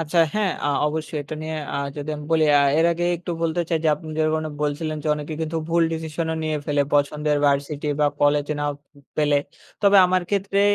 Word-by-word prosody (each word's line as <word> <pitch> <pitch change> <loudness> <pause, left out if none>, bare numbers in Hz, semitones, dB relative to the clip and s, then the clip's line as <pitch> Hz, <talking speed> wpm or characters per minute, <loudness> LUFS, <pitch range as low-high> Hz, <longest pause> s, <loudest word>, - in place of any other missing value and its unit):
আচ্ছা, 165 +2 -1 0.2
হ্যাঁ। 210 -3 +1 0.2
আ - - +2 0.2
অবশ্যই 155 0 -4
এটা 150 +2 -7
নিয়ে 160 0 -4 0.2
আ - - 0 0.2
যদি 145 +1 -4
আমি 150 - -8
বলি, 160 -1 +4 0.2
আ - - +4 0.2
এর 165 - +4
আগে 175 +1 -2
একটু 175 +1 -7
বলতে 165 +1 0
চাই, 165 -2 +1
যে - - +4
আপনি 155 +2 -11
যেরকমটা 155 0 0
বলছিলেন 155 +1 -2
যে 155 - -2
অনেকে 150 +1 -5
কিন্তু 160 +1 -2
ভুল 170 0 +3
ডিসিশন 160 0 -3
ও - - -2
নিয়ে 155 -1 -1
ফেলে 145 -1 +2
পছন্দের 150 +1 +1
ভার্সিটি 140 +1 0
বা 150 - +4
কলেজ 145 0 +3
নাও 145 0 0 0.4
পেলে। 145 -1 +3 0.4
তবে 200 0 +6
আমার 185 0 +1
ক্ষেত্রে 200 0 +1
155 Hz, 205 wpm, -23 LUFS, 150-165 Hz, 0.4 s, তবে